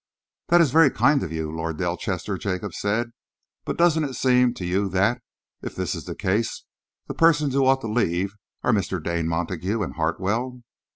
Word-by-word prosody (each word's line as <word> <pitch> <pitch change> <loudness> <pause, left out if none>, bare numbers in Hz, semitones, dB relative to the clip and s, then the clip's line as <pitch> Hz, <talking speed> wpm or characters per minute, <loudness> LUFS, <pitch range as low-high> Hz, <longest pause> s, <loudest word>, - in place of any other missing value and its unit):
"This 175 0 +6
is 155 -6 +3
very 160 0 +6
kind 135 +5 +3
of 80 - -4
you, 80 -1 -3
Lord 80 0 -4
Delchester," - - -2
Jacob 95 -1 -3
said, 115 +4 -1 0.5
"but - - -3
doesn't 170 -2 +3
it 135 -3 -4
seem 125 -1 +3
to 90 - -5
you 95 +3 0
that, 95 +6 +1 0.4
if - - -7
this - - -2
is - - -6
the - - -6
case, 105 +5 -1 0.4
the - - -5
persons 150 -4 +3
who 135 -1 +3
ought 135 0 +3
to 115 - -4
leave 100 -4 0 0.3
are 125 - +3
Mr. 95 -2 0
Dane 85 -1 -1
Montague 90 +5 -2
and - - -5
Hartwell?" 105 +10 -1
105 Hz, 185 wpm, -24 LUFS, 90-130 Hz, 0.5 s, This